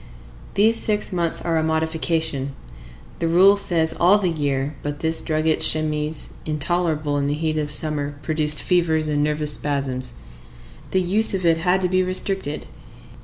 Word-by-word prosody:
These 220 +3 +4
six 210 -2 0
months 170 -2 -2
are 165 -1 0
a - - -1
modification: 160 -3 -1 0.6
the 165 - 0
rule 185 +4 +6
says 165 -5 +1
all 185 +4 +4
the 185 -4 0
year, 145 -2 -2
but 145 0 -5
this 160 0 0
drugget 155 0 0
chemise, 155 -1 +1
intolerable 155 -1 -1
in 140 - -1
the 145 - -1
heat 155 0 -1
of 150 -1 -3
summer, 145 -1 -2
produced 155 -1 +2
fevers 160 -4 +1
and 145 -1 +1
nervous 150 0 -1
spasms. 135 -4 -3 0.7
The 190 - +1
use 200 +4 +1
of 185 -2 -3
it 165 -1 +4
had 180 +3 +1
to 180 - +1
be 185 +1 +1
restricted. 185 -4 -1
160 Hz, 160 wpm, -22 LUFS, 150-175 Hz, 0.7 s, rule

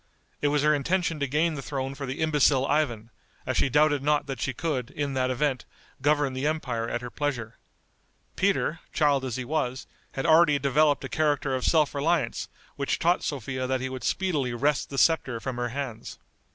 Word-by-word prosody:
It 145 - +2
was 145 0 +1
her 150 0 +5
intention 165 +2 0
to 140 - 0
gain 155 +5 +1
the 140 - -5
throne 135 -1 -4
for 140 0 -6
the 130 +4 -4
imbecile 145 -4 +3
Ivan, 120 -7 0 0.3
as - - -2
she - - +2
doubted 145 +1 +3
not 150 +1 +1
that 135 -4 -5
she 135 - 0
could, 140 -4 -3
in 145 -2 -3
that 130 -1 0
event, 130 -1 0 0.4
govern 145 -1 +2
the 130 +3 -1
empire 125 -7 -2
at 120 - -2
her 120 -1 -7
pleasure. 125 -7 -3 0.8
Peter, 190 -4 +1
child 145 -3 +2
as 130 -3 -3
he 130 -1 -4
was, 130 -3 -2 0.3
had 135 - -3
already 160 -2 +5
developed 140 +1 +2
a - - -3
character 145 -2 0
of 130 -1 -1
self 155 -3 +3
reliance 155 +3 0 0.3
which 140 -1 0
taught 175 +2 +2
Sophia 130 -2 -3
that 130 0 0
he 130 +1 -3
would 130 -1 -6
speedily 145 -10 0
wrest 145 +4 0
the 135 - -6
scepter 135 -7 +2
from 125 +1 -5
her 120 0 -1
hands. 130 -3 -6
140 Hz, 195 wpm, -27 LUFS, 130-150 Hz, 0.8 s, her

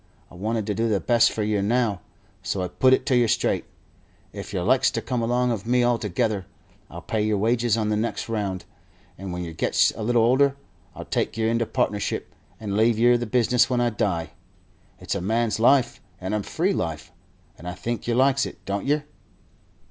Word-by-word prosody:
I - - -15
want 110 +4 -2
to 105 - -1
do 115 +3 0
the 105 -3 +1
best 115 +5 +3
for 110 - -2
yer 105 -1 0
now, 110 -2 0 0.4
so 95 - -2
I 90 - -3
put 130 +8 +3
it 130 - +3
to 130 - +2
yer 120 -1 +4
straight: - - 0 0.7
If - - -7
yer - - -2
likes - - +3
to - - -3
come 125 -2 -2
along 120 +2 +1
of 115 -1 -4
me 125 0 +3
altogether, 110 -4 0 0.4
I'll - - -9
pay 110 - -1
yer 105 -1 +1
wages 115 +2 +1
on 110 -1 0
the 105 - +1
next 110 +2 -2
round, 100 -5 -3 0.5
and 95 0 -7
when 90 0 -4
yer 85 -1 -6
gets - - +2
a - - -9
little 115 +1 +2
older 135 +4 +3 0.4
I'll - - -8
take - - -2
yer 110 0 +1
into 115 0 0
partnership 100 -1 -2 0.3
and 100 -2 -4
leave 110 +1 +3
yer 120 +2 +5
the 120 -1 -2
business 125 +2 +2
when 125 -1 +1
I 120 -1 +1
die. 100 -7 -2 0.7
It's - - -4
a - - -2
man's 110 +3 0
life 130 +2 +3 0.2
and 95 +2 -4
a 105 - 0
free 180 - -1
life, 80 - -4 0.4
and 85 - -11
I 90 - -4
think 115 +7 -4
yer 120 - +1
likes 135 +1 +3
it, - - -13
don't 100 +4 -3
yer?" 145 +1 +1
115 Hz, 210 wpm, -24 LUFS, 100-120 Hz, 0.7 s, yer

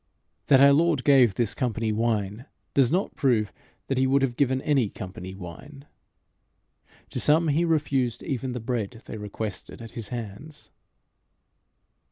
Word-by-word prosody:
That 135 -2 +6
our 140 0 +8
Lord 160 -3 +2
gave 130 -8 +5
this 115 -2 0
company 115 -4 -1
wine, 110 +1 -1 0.3
does 135 -2 +3
not 185 +4 0
prove 110 - +1 0.3
that 135 -1 -1
he 130 - +3
would 135 +1 +3
have 125 -3 0
given 130 -1 +1
any 135 -8 +2
company 95 0 -8
wine. 120 - -10 1.3
To - - -3
some 155 +2 +3
he 160 +4 +2
refused 135 -7 0
even 130 -3 -3
the 125 - -4
bread 115 -1 -4
they - - -7
requested 105 0 -6
at 115 -1 -9
his 115 -4 -7
hands. 120 +6 -8
125 Hz, 150 wpm, -26 LUFS, 110-140 Hz, 1.3 s, our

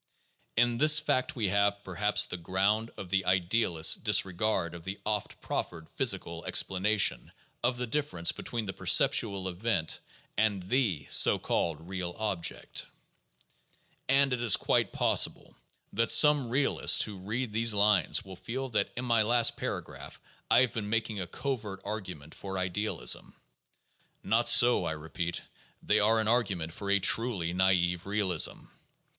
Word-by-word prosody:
In 120 0 +1
this 150 +1 +6
fact 130 -4 -1
we 110 -6 -1
have, 100 +1 0
perhaps, 100 +3 +1
the - - -6
ground 95 +6 -1
of 90 -2 -9
the 95 0 +1
idealist's 90 -2 +2
dis - - +2
regard 95 -2 -2
of 85 -1 -10
the 95 +3 -6
oft 105 -1 -3
proffered 80 -2 -5
physical - - -1
explanation 95 - +1 0.3
of 125 +1 0
the 125 - -3
difference 115 - 0
between 115 -2 -5
the 95 - -5
perceptual 95 +1 +2
event 95 -2 -2 0.4
and 105 -3 0
the 95 - -1
(so - - +6
called) 80 0 -3
real 90 -2 -5
object. 100 -6 -3 1.2
And 135 0 +3
it 125 - -3
is 115 -5 +4
quite - - 0
possible - - +1 0.4
that 115 +2 +1
some 150 -5 +5
realists 135 +4 +2
who 105 -3 -8
read 110 +5 -5
these 115 -1 +1
lines 100 -3 +2
will 95 -1 -10
feel 130 +7 -6
that 105 -4 -1
in 125 - -3
my 115 -2 +3
last 120 +2 +3
paragraphs - - -7 0.3
I - - +5
have 130 - +1
been 105 -2 -5
making 110 -2 -2
a 90 - -5
covert 110 -5 -5
argument 90 -8 -7
for 95 -1 -7
idealism. 95 +4 -1 0.9
Not 115 +4 +2
so, 120 0 +5
I - - -3
repeat; 80 +2 -5 0.4
they 105 - +2
are 110 +2 +2
an 110 - -2
argument 95 -9 -1
for 100 +2 -7
a 100 - +4
truly 100 -4 +1
naive 90 -1 0
realism. 100 -5 +1
100 Hz, 150 wpm, -28 LUFS, 90-115 Hz, 1.2 s, this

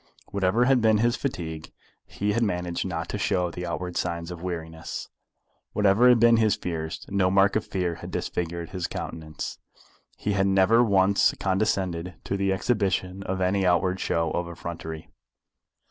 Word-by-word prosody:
Whatever 100 +5 +2
had 130 -1 +4
been 110 -1 +4
his 120 +3 +2
fatigue, 80 - -4 0.4
he 105 +1 -1
had 115 - 0
managed 90 -5 -1
not 85 -1 -3
to 105 - -3
show 90 -4 0
the 90 +1 -5
outward 90 +1 -4
signs 85 -1 -2
of 85 -2 -7
weariness. 80 -3 -5 0.7
Whatever 105 +4 +5
had 120 -1 +6
been 115 0 +6
his 110 -3 +3
fears, 80 -2 -5
no 95 -2 +2
mark 95 +1 +4
of 110 - 0
fear 90 -3 -1
had - - -7
disfigured 85 -1 -3
his 90 -3 -3
countenance. 80 -1 -6 0.6
He 105 - -2
had 100 0 +2
never 95 +5 +5
once 100 -2 +3
condescended 95 -3 0
to - - -2
the 100 0 +1
exhibition 95 -2 0
of 95 -1 -3
any 95 +1 +2
outward 90 +1 +2
show 85 -1 0
of 85 0 -2
effrontery. 80 -2 -7
95 Hz, 160 wpm, -26 LUFS, 85-100 Hz, 0.7 s, had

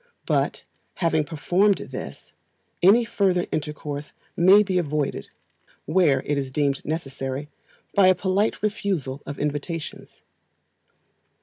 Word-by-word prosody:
But, - - 0 0.3
having 160 -3 +1
performed 180 +6 +2
this, - - -8 0.5
any 215 +6 +6
further 185 -5 +1
intercourse 150 -1 -4 0.2
may 190 +4 +6
be 185 -2 0
avoided 150 -3 -2 0.6
(where 150 -8 +3
it 145 -1 0
is 135 -1 -3
deemed 140 0 0
necessary) 140 -2 -4 0.4
by 200 -2 +5
a 185 - +6
polite 195 +4 0
refusal 185 -10 -2
of 140 - -5
invitations. 150 +2 -5
160 Hz, 110 wpm, -24 LUFS, 145-190 Hz, 0.6 s, any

